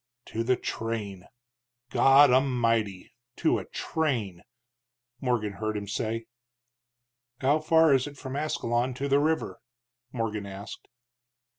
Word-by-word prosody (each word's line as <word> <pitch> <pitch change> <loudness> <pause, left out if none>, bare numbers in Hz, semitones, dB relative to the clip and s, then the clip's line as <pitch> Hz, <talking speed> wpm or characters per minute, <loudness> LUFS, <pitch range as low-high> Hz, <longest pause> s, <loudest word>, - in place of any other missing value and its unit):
"To 115 - -1
a - - +5
train! 105 -6 -4 0.6
God 135 0 +6
A'mighty 115 -7 +1 0.2
to 160 - +2
a - - -8
train!" 120 - -2 0.8
Morgan 120 -5 -1
heard 110 +1 -3
him 100 -1 -5
say. 115 +2 -3 1.1
"How 140 +3 +3
far 160 -1 +4
is 135 +1 +2
it 145 -1 -10
from 130 -1 -6
Ascalon 125 -4 -1
to 140 +2 -3
the 140 0 +3
river?" 160 +2 -1 0.5
Morgan 110 -4 -3
asked. 100 +2 -9
120 Hz, 120 wpm, -27 LUFS, 110-140 Hz, 1.1 s, God